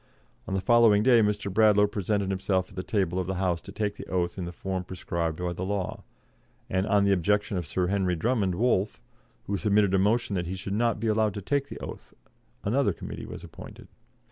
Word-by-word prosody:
On 95 - -2
the 95 - 0
following 115 -2 +5
day 120 -1 +6
Mr. 105 -2 0
Bradlaugh 105 -1 +5
presented 100 -1 -1
himself 95 -1 0
at - - -14
the 90 - -2
table 95 -3 0
of 90 - -2
the 95 - -2
House 90 -2 0
to - - -10
take 105 -1 -2
the - - -8
oath 90 -1 -1
in 90 - -4
the 85 - -5
form 95 +1 -4
prescribed 85 -3 -3
by 90 -1 -2
the 85 - -7
law, 100 -1 -3 0.7
and 95 +2 +1
on 105 -2 +3
the 100 - +3
objection 100 +2 +1
of 90 -4 -3
Sir 90 +4 0
Henry 95 -1 +1
Drummond 100 -1 0
Wolff, 105 -2 +1 0.5
who 100 - -1
submitted 100 -1 +2
a 95 - +4
motion 105 +1 +1
that 90 -2 -2
he 95 - -3
should 95 +1 -5
not 115 +1 +1
be 115 - -3
allowed 110 -2 +1
to 100 - -4
take 140 +5 0
the - - -7
oath, - - -9 0.5
another 130 +7 +2
Committee - - -7
was - - -8
appointed. - - -11
100 Hz, 220 wpm, -27 LUFS, 90-105 Hz, 0.7 s, day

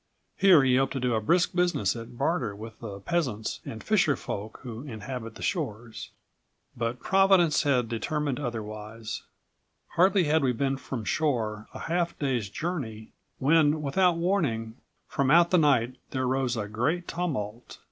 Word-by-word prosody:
Here 185 -7 +6
he 130 -1 +4
hoped 135 0 +1
to 135 - -2
do 125 -1 0
a 110 - +1
brisk 175 - +2
business 175 - +1
at 115 +1 -9
barter 135 - 0
with 110 +2 -10
the 100 -4 -7
peasants 130 - -1
and 110 - -7
fisher 175 -9 +3
folk 105 +2 -6
who 120 -2 -6
inhabit 115 -2 -6
the - - -9
shores. 120 - -3 0.7
"But 115 +1 -2
Providence 190 -4 +4
had 130 -5 +2
determined 145 +4 -2
otherwise. 110 -3 -5 0.7
Hardly 190 +2 +4
had 155 -1 +2
we 130 -2 +2
been 135 +3 0
from 125 -4 -6
shore 110 -9 -1
a - - -6
half 170 0 -1
day's 125 -8 -1
journey, 115 - -4 0.3
when, 150 +1 +3
without 175 +5 +2
warning, 145 - 0 0.3
from 140 -1 0
out 170 +3 +6
the 180 - +5
night 130 -5 +2
there 130 -1 -1
rose 130 -1 0
a 105 -2 -2
great 140 +12 -1
tumult. 125 -10 -4
130 Hz, 155 wpm, -27 LUFS, 115-165 Hz, 0.7 s, Here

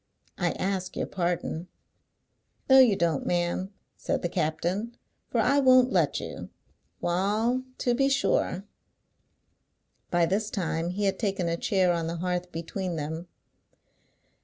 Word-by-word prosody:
I - - +1
ask 190 -1 -2
your - - 0
pardon." 175 -1 -2 1.0
"No 265 0 +8
you 245 -6 +6
don't, 165 -5 0
ma'am," 175 +2 0 0.3
said - - -2
the 175 - 0
captain, 180 +8 -2 0.3
"for 235 - 0
I 270 +6 +4
won't 255 -1 +6
let - - +2
you. - - -7 0.5
Wa'al, 210 +8 +1 0.2
to 245 - +1
be 270 +3 +2
sure!" 200 -7 +1 1.4
By 175 -1 +3
this 205 +5 0
time 170 -4 -2
he 195 +3 -3
had 195 -1 +1
taken 195 -5 -1
a 165 - 0
chair 185 0 +2
on 165 -1 -2
the 165 - -3
hearth 180 0 -2
between 170 +2 -4
them. 160 +3 -4
185 Hz, 135 wpm, -27 LUFS, 170-215 Hz, 1.4 s, No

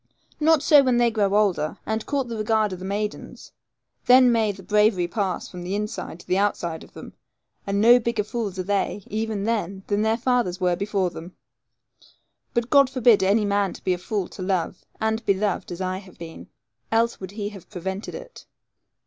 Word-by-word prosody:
Not 315 -1 +4
so 295 -2 +7
when 255 -3 +2
they 240 -1 +3
grow 205 -3 +1
older, 190 -5 +1
and 220 0 -3
court 275 -3 -1
the 230 - -5
regard 215 -2 +1
of 180 - -7
the 185 - -7
maidens; 205 +2 -5 0.6
then 250 0 +7
may 225 -3 +2
the 195 -1 -12
bravery 210 -3 +2
pass 190 0 -2
from 180 - -9
the 180 +3 -3
inside 210 -4 -5
to - - -21
the 185 - +1
outside 170 -5 -1
of - - -17
them; - - -10 0.5
and 200 0 0
no 240 +3 +7
bigger 235 -2 -1
fools 210 -3 -4
are 185 - -2
they, 200 +1 -1
even 215 -1 -3
then, 200 -4 -2
than 205 0 0
their 220 +1 +1
fathers 240 -7 0
were 180 -1 +1
before 195 -2 -1
them. 170 +3 -10 1.2
But 235 0 -1
God 280 -2 +6
forbid 245 -4 +4
any 205 +3 +3
man 200 -1 +1
to - - -13
be 185 - +1
a 180 - -4
fool 195 0 -3
to - - -10
love, 185 -2 -2 0.2
and 220 +1 -1
be 200 -2 +2
loved, 200 -1 -2
as 175 +1 -6
I 185 0 -2
have 190 -2 -16
been. 165 -1 -10 0.4
Else 230 +1 +1
would 190 0 -8
he 205 -1 -4
have 195 -4 -13
prevented 190 +1 -5
it. - - -11
205 Hz, 200 wpm, -24 LUFS, 190-225 Hz, 1.2 s, so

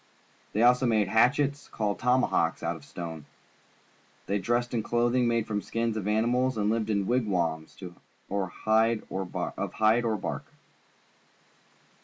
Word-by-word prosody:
They 110 - +2
also 125 +1 +5
made 110 -4 +2
hatchets, 140 +6 +2
called 105 -2 -2
tomahawks, 125 -11 +1
out 85 +1 -1
of 80 - -12
stone. 80 +1 -7 1.0
They 100 +1 0
dressed 120 +5 -1
in 115 - +1
clothing 120 +2 +1
made 115 -2 +1
from 105 -2 -2
the - - -9
skins 115 -1 -1
of 105 -2 -3
animals 120 +4 +1
and 105 0 +1
lived 110 -1 -1
in 100 -2 +1
wig 120 +1 +1
wams 80 -5 -2 0.5
of 100 -2 -1 0.2
hide 110 +1 +3
or 95 0 -2 0.9
bark. 105 - -4
110 Hz, 140 wpm, -28 LUFS, 100-120 Hz, 1.0 s, also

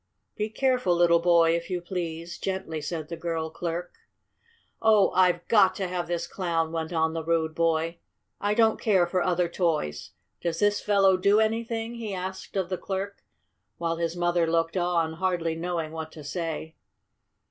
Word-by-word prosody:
"Be 210 +1 -2
careful, 250 -6 +1
little 170 -1 +5
boy, 170 -1 +4
if 170 +2 -4
you 180 -1 -1
please," 170 -1 -5
gently 190 -5 -3
said 155 0 -4
the 170 - -5
girl 165 -1 -3
clerk. 170 +1 -4 0.9
"Oh, 215 -3 +5
I've 180 -2 +2
got 205 -4 +5
to 190 - -2
have 180 -1 -3
this 175 -1 -2
Clown!" 165 -4 -1
went 160 0 -3
on 160 -1 +1
the 165 -1 -3
rude 160 -1 0
boy. 165 +1 0 0.4
"I 205 +1 0
don't 225 -1 +3
care 190 -5 +4
for 180 +1 0
other 180 -1 +1
toys. 155 - -1 0.3
Does 170 -1 -1
this 205 +1 +2
fellow 195 -2 +4
do 200 +3 +4
anything?" 225 +1 -1
he 225 -4 -5
asked 185 +2 -6
of 185 -2 -1
the 185 - -2
clerk, 195 +1 -4 0.6
while 165 -1 -1
his 170 0 -2
mother 175 -1 +1
looked 165 +1 +1
on, 175 -3 +1
hardly 170 -1 -1
knowing 165 -1 -3
what 160 0 -6
to 155 - -10
say. 160 +1 -4
175 Hz, 170 wpm, -27 LUFS, 165-190 Hz, 0.9 s, little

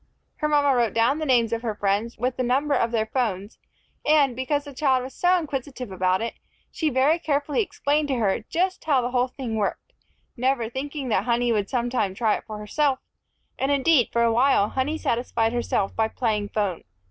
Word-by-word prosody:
Her 300 - 0
mama 290 -2 +3
wrote 235 -4 +1
down 235 +6 +2
the 310 - -3
names 235 -3 +3
of 230 - -1
her 225 -3 -3
friends, 205 +3 -1
with 250 +2 -1
the - - -2
number 270 +4 +1
of 235 - +2
their 225 -2 0
phones, 220 -4 -3 0.4
and, 290 -4 +3
because 285 +3 -1
the 285 -1 -10
child 260 -2 +1
was 260 - -8
so 360 +1 +3
inquisitive 270 - -5
about 185 +2 +1
it, 230 - -3 0.4
she 315 - -1
very 280 +5 +2
carefully 295 +2 0
explained 300 -6 0
to 270 - 0
her 210 -5 +1
just 370 +2 -1
how 275 -5 +2
the 245 - -2
whole 250 0 +2
thing 250 -3 -5
worked, 215 - -3 0.4
never 250 -2 0
thinking 275 +1 -4
that - - +1
Honey 240 0 +1
would 205 -3 0
sometime 240 -6 -1
try 220 -1 +2
it - - -8
for 215 -1 -6
herself; 265 +6 0 0.6
and, 270 +2 +1
indeed, 280 -2 +3
for 235 - +2
a 230 -1 +3
while 240 -4 +3
Honey 280 +4 -1
satisfied 230 -3 0
herself 235 -4 -1
by 220 0 +2
playing 215 -3 -1
phone. 200 -6 -2
250 Hz, 200 wpm, -24 LUFS, 225-285 Hz, 0.6 s, mama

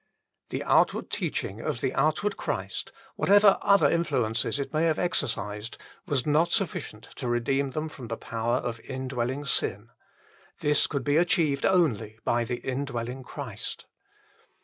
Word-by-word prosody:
1 - - -2
The - - -4
outward - - +2
teaching 100 +4 -2
of 115 - -2
the 130 - -1
outward 155 +9 +1
Christ, - - -4 0.2
whatever 205 0 +5
other 200 -1 +5
influences 125 -9 0
it 140 +1 -4
may 155 +2 +2
have 160 -2 +2
exercised, 115 - -1 0.3
was 140 -7 0
not 155 +3 +3
sufficient 160 - -2
to 125 - -4
redeem 135 +4 +1
them 155 +4 -3
from 135 -6 -9
the 115 0 -4
power 115 +1 -1
of 115 -2 -3
indwelling 130 +1 -3
sin; 110 -4 -1 0.7
this 150 -1 +3
could 140 -3 -2
be 145 +3 +2
achieved 165 -5 +3
only 115 - +2
by 120 0 +2
the 120 +1 -3
indwelling 130 -2 -3
Christ. 125 - -6
135 Hz, 150 wpm, -27 LUFS, 115-155 Hz, 0.7 s, whatever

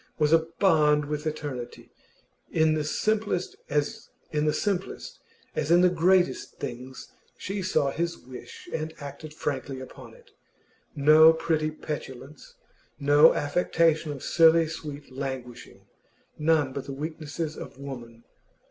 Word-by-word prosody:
was 150 0 +3
a 160 0 +4
bond 150 -6 +4
with 150 +1 -3
eternity. 145 -6 -6 0.6
In 160 -1 +3
the 155 -1 0
simplest 210 +4 -1
as 150 +11 -2 0.2
in 150 -1 0
the 180 - 0
greatest 175 -4 +2
things 125 +2 -7 0.3
she 195 +1 -4
saw 155 -7 +1
his 170 +3 -2
wish 125 0 -11
and 160 0 -3
acted 145 +2 -8
frankly 140 -3 -4
upon 130 - -11
it. 485 0 -21 0.6
No 155 +2 +7
pretty 160 -1 0
petulance, 145 -2 -8 0.4
no 145 +3 +6
affectation 160 0 +1
of 140 -3 -7
silly 165 0 +5
sweet 150 -3 -8
languishing, 130 -3 -7 0.5
none 150 -4 +1
of 140 - -5
the 140 - -5
weaknesses 155 +1 -5
of - - -9
woman. 120 -4 -9
155 Hz, 120 wpm, -27 LUFS, 140-165 Hz, 0.6 s, No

